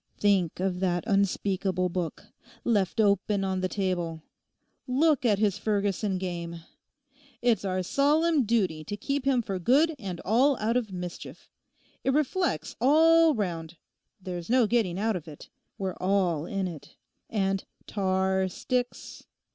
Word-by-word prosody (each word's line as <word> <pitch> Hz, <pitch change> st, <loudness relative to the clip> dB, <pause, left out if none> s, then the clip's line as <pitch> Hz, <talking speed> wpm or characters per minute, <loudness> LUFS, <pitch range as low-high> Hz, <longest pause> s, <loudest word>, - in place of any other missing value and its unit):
Think 195 Hz, -6 st, +2 dB
of 185 Hz, -1 st, -1 dB
that 175 Hz, -2 st, 0 dB
unspeakable 195 Hz, -3 st, 0 dB
book. 175 Hz, -2 st, -4 dB, 0.4 s
Left 205 Hz, -4 st, +1 dB
open 200 Hz, -1 st, +2 dB
on 190 Hz, -1 st, -1 dB
the 185 Hz, -, -1 dB
table! 175 Hz, -5 st, -2 dB, 0.6 s
Look 275 Hz, +1 st, +2 dB
at 210 Hz, -3 st, +3 dB
his 205 Hz, -1 st, +1 dB
Ferguson 205 Hz, -2 st, 0 dB
game. 170 Hz, -2 st, -5 dB, 0.8 s
It's 235 Hz, -4 st, +2 dB
our 185 Hz, -1 st, -1 dB
solemn 295 Hz, -, +2 dB
duty 190 Hz, -9 st, 0 dB
to 205 Hz, -, -5 dB
keep 275 Hz, +4 st, -2 dB
him 260 Hz, -3 st, +2 dB
for 195 Hz, -3 st, -3 dB
good 285 Hz, -, +3 dB
and 185 Hz, -6 st, -5 dB
all 255 Hz, +6 st, +3 dB
out 225 Hz, +2 st, 0 dB
of 235 Hz, -5 st, -1 dB
mischief. 180 Hz, -1 st, -8 dB, 0.5 s
It 265 Hz, -, +1 dB
reflects 305 Hz, +6 st, 0 dB
all 320 Hz, +3 st, +5 dB
round. 170 Hz, -5 st, -3 dB, 0.4 s
There's 180 Hz, -1 st, -6 dB
no 250 Hz, -1 st, +4 dB
getting 210 Hz, -6 st, +1 dB
out 220 Hz, +1 st, 0 dB
of 170 Hz, -3 st, -6 dB
it; 150 Hz, -2 st, -11 dB, 0.3 s
we're 190 Hz, -2 st, -3 dB
all 180 Hz, -4 st, +1 dB
in 195 Hz, -1 st, -2 dB
it. 160 Hz, -5 st, -10 dB, 0.3 s
And 195 Hz, -2 st, 0 dB, 0.2 s
tar 190 Hz, -1 st, 0 dB
sticks. 245 Hz, +6 st, -4 dB
195 Hz, 140 wpm, -27 LUFS, 180-240 Hz, 0.8 s, all